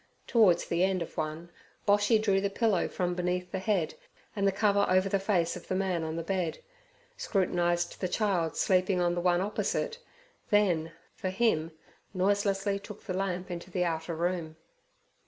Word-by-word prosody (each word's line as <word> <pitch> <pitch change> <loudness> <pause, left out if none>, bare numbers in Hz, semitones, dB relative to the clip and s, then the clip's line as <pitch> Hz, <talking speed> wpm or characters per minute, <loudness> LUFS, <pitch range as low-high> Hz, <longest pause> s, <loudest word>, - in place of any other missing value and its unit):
Towards 200 -8 +4
the 170 +1 +1
end 190 -2 +1
of - - -12
one 155 +2 -4 0.4
Boshy 205 +2 +4
drew 200 -3 +2
the 200 - 0
pillow 210 -2 +1
from 180 -1 -2
beneath 180 0 -2
the 190 - -2
head 190 -4 0 0.4
and 200 -1 +1
the - - +4
cover 200 0 +2
over 185 +1 +3
the 195 0 +1
face 185 -4 +1
of - - -10
the 185 - -1
man 185 -3 0
on 160 0 -3
the 165 - -3
bed, 180 -2 -1 0.6
scrutinized 175 -3 0
the 185 - +1
child 180 -5 0
sleeping 185 0 +2
on 175 -1 +2
the 175 - -1
one 175 0 +3
opposite, 210 - -2 0.5
then, 180 -6 +2 0.2
for 190 - -3
him, 185 -6 +1 0.4
noiselessly 200 +1 +1
took 210 +1 -11
the 185 - -4
lamp 185 -1 -2
into 175 +1 -6
the 180 0 0
outer 165 0 -2
room. 170 -1 -2
185 Hz, 175 wpm, -29 LUFS, 175-200 Hz, 0.6 s, Towards